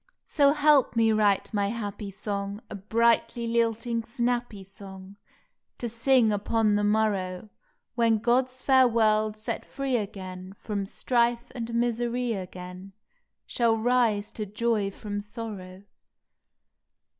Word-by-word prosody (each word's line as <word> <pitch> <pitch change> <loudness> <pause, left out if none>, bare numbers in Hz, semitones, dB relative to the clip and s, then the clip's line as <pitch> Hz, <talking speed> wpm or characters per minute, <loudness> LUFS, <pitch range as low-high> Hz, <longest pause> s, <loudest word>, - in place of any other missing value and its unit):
So 285 -1 +4
help 295 -4 +4
me 225 -1 +4
write 210 -1 +2
my 200 -1 +1
happy 205 -2 -4
song, 200 0 -4
A - - -4
brightly 230 +3 +1
lilting, 230 0 0
snappy 240 -3 -2
song, 190 -1 -10
May - - -13
Twelfth 200 - -35
To 240 - -4
sing 235 -1 +3
upon 210 +1 +1
the 205 0 +1
morrow, 205 -2 0 0.4
When 230 -2 +3
God 240 +4 +2
s 255 0 -13
fair 260 -2 +6
world 215 -2 +2
set 215 - -4
free 270 -2 -2
again 190 -2 -7
From 200 -2 -4
strife 240 +2 0
and 235 -2 -5
misery 240 0 0
again 185 0 -8 0.5
Shall 230 -2 +1
rise 225 -3 +1
to 215 -2 -5
joy 210 0 0
from 205 +1 -5
sorrow. 205 -4 -8
220 Hz, 135 wpm, -27 LUFS, 200-235 Hz, 0.5 s, fair